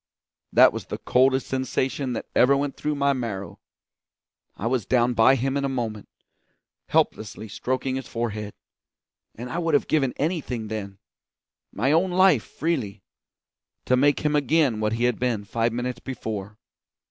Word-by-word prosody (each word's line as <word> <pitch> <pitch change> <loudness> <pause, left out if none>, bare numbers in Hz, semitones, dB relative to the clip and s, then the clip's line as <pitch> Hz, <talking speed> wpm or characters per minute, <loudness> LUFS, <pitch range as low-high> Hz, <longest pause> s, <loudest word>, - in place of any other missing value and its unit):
That - - +6
was - - -6
the - - -4
coldest 130 +1 +2
sensation 130 0 -2
that - - -4
ever 135 +2 +5
went 140 0 -2
through 150 0 -2
my 140 0 +2
marrow. 115 -7 -5 1.0
I 105 - -5
was 120 -3 0
down 125 -1 +2
by 120 +3 +5
him 135 +2 -1
in 140 - 0
a 140 - 0
moment, 115 -5 -4 0.8
helplessly 110 0 0
stroking 130 +5 -2
his 135 - -6
forehead; 110 -3 -4 0.8
and 120 +2 -7
I 130 +7 -3
would 165 -3 +1
have - - +1
given 135 -5 +1
anything 140 - -2
then 100 -3 -5 0.7
my 130 +7 0
own 170 +4 +3
life 180 - +4
freely 115 - -3 0.8
to 125 - +3
make 140 +2 +3
him 150 0 +1
again 145 -5 +2
what 105 0 0
he 115 +1 -1
had 125 -1 +1
been 120 -5 -1
five 115 +3 0
minutes 120 +1 -3
before. 105 -6 -6
125 Hz, 160 wpm, -24 LUFS, 110-140 Hz, 1.0 s, That